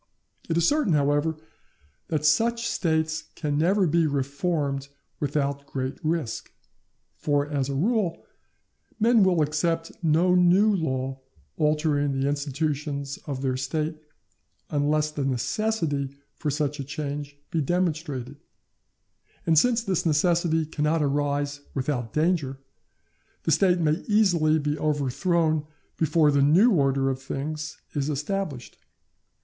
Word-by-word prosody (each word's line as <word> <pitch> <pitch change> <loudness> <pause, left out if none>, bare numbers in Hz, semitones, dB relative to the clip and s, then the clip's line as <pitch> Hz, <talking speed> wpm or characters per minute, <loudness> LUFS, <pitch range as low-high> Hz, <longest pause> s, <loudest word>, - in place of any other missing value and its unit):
It 165 - +1
is 170 - +3
certain, 290 - +2
however, 145 +2 +1 0.7
that 155 -1 -1
such 230 +9 +2
States 160 -1 0
can 150 -3 -2
never 185 +6 +3
be 165 0 +2
reformed 140 0 -1 0.3
without 140 -1 -1
great 130 0 -4
risk; 155 -7 -2 0.7
for, 145 -1 0
as 140 -2 -1
a 140 - -2
rule, 200 - 0 0.7
men 230 +1 +5
will 180 -4 +3
accept 165 +2 -1
no 165 +3 +3
new 185 +4 +5
law 135 -5 -2 0.4
altering 150 -2 +1
the 135 - +1
institutions 145 0 -2
of 135 -2 -4
their 130 -1 0
State, 155 +4 -3 0.7
unless 150 +1 +1
the 145 -2 -3
necessity 140 - -1 0.2
for 150 - -3
such 145 0 -1
a - - -2
change 145 0 -5
be 165 - +1
demonstrated; 150 -5 -2 1.1
and 160 -2 +5
since 235 +4 +2
this 190 -6 0
necessity 165 0 +2
cannot 155 +1 0
arise 145 0 -1
without 130 -4 -2
danger, 155 -2 0 0.9
the 160 - 0
State 180 +4 +4
may 155 -2 +1
easily 175 -8 +3
be 150 0 -2
overthrown 155 +2 +1 0.3
before 155 -1 +3
the 140 -1 +3
new 175 - +5
order 135 -6 +2
of 130 0 -5
things 150 +3 -4 0.2
is 145 0 -1
established. 150 -2 -3
150 Hz, 125 wpm, -26 LUFS, 140-165 Hz, 1.1 s, men